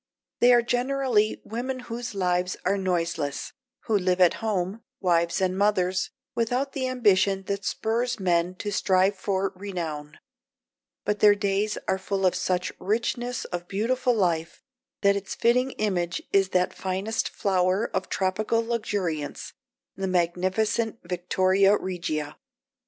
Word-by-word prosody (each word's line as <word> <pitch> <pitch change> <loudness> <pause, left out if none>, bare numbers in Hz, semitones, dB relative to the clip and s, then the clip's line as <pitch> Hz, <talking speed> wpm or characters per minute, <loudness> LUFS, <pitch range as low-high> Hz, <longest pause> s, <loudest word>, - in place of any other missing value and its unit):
They 245 - +6
are 240 -1 +5
generally 245 -3 +1
women 255 +3 -4
whose 235 -2 -6
lives 180 -1 0
are 195 +2 +3
noiseless, 170 -6 -2 0.3
who 220 - 0
live 185 -2 +1
at 180 -2 +6
home, 205 -1 -1 0.2
wives 170 -2 +2
and 185 -1 +1
mothers, 190 -2 +1 0.2
without 245 +4 -1
the 260 -2 -1
ambition 200 -6 +2
that 200 +1 -3
spurs 235 +2 -1
men 175 -1 +1
to 205 +3 -4
strive 190 0 +2
for 190 0 -1
renown, 165 -6 -5 0.9
but 210 0 0
their 210 -1 +7
days 205 +1 0
are 190 0 +1
full 195 0 -1
of 185 - +4
such 180 0 -1
richness 235 +4 -1
of 175 -1 -5
beautiful 240 +5 +1
life 170 -5 -1 0.4
that 200 -1 +4
its 200 -1 -4
fitting 250 +3 +3
image 180 -5 -1
is 195 -1 +4
that 180 -1 +1
finest 190 +4 -2
flower 185 +2 +1
of 190 - -2
tropical 215 +4 0
luxuriance, 200 -10 -3 0.4
the 195 0 -2
magnificent 185 +6 0
Victoria 185 +3 +2
Regia. 155 -5 -3
195 Hz, 135 wpm, -26 LUFS, 180-220 Hz, 0.9 s, their